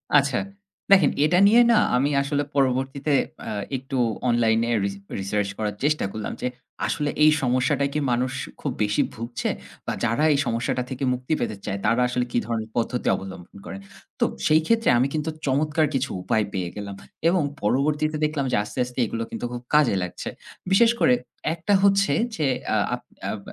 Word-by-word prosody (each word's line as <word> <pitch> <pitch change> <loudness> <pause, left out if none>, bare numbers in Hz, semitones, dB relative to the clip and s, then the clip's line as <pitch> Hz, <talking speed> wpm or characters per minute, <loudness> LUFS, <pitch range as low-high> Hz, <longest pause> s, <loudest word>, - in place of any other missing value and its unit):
আচ্ছা 140 -3 +4 0.5
দেখেন 190 -7 +7
এটা 175 +3 +3
নিয়ে 230 +4 +6
না 230 - +5 0.2
আমি 135 +3 +2
আসলে 145 +1 -1
পরবর্তীতে 135 +2 +1 0.3
অ্যা - - -5 0.3
একটু 130 +1 -5 0.3
অনলাইনে 115 -1 +2
রি 100 - +1 0.3
রিসার্চ 100 +1 -1
করার 105 -2 -2
চেষ্টা 150 -3 +1
করলাম 110 0 -5
যে - - 0 0.4
আসলে 150 -2 -1
এই 155 - +7
সমস্যাটায় 130 +2 +1
কি 150 - 0
মানুষ 125 +2 0 0.3
খুব 140 - -2
বেশি 105 0 +1
ভুগছে 115 +2 -3 0.4
বা - - 0
যারা 120 +6 +1
এই 140 - +1
সমস্যাটা 120 +1 -1
থেকে 130 0 -5
মুক্তি 125 +4 -3
পেতে 110 - -2
চায় 100 -1 -3
তারা 115 +3 +3
আসলে 125 0 -1
কি - - 0
ধরনের 110 -2 -3
পদ্ধতি 120 +1 -1
অবলম্বন 95 -1 -9
করেন? 95 - -7 0.4
তো - - +4 0.2
সেই 155 +1 +5
ক্ষেত্রে 230 0 +3
আমি 125 +3 +3
কিন্তু 155 0 -1 0.2
চমৎকার 150 +3 +2
কিছু 135 +1 0
উপায় 105 +4 +1
পেয়ে 90 -2 -2
গেলাম। 100 -1 -6 0.3
এবং 175 -2 +2 0.2
পরবর্তীতে 150 +7 +1
দেখলাম 150 -2 -1
যে - - +2
আস্তে, - - -10
আস্তে 125 +1 -8
এগুলো 115 +1 -3
কিন্তু - - -4
খুব 120 0 -5
কাজে 150 -9 +4
লাগছে। 90 - -5 0.4
বিশেষ 230 +4 +6
করে 125 - +5 0.4
একটা 170 +5 -1
হচ্ছে 200 0 +4 0.2
যে 155 - -1 0.3
আ - - +3 0.2
আপ 125 - -12 0.3
আপ 110 - -5
130 Hz, 175 wpm, -24 LUFS, 115-150 Hz, 0.5 s, দেখেন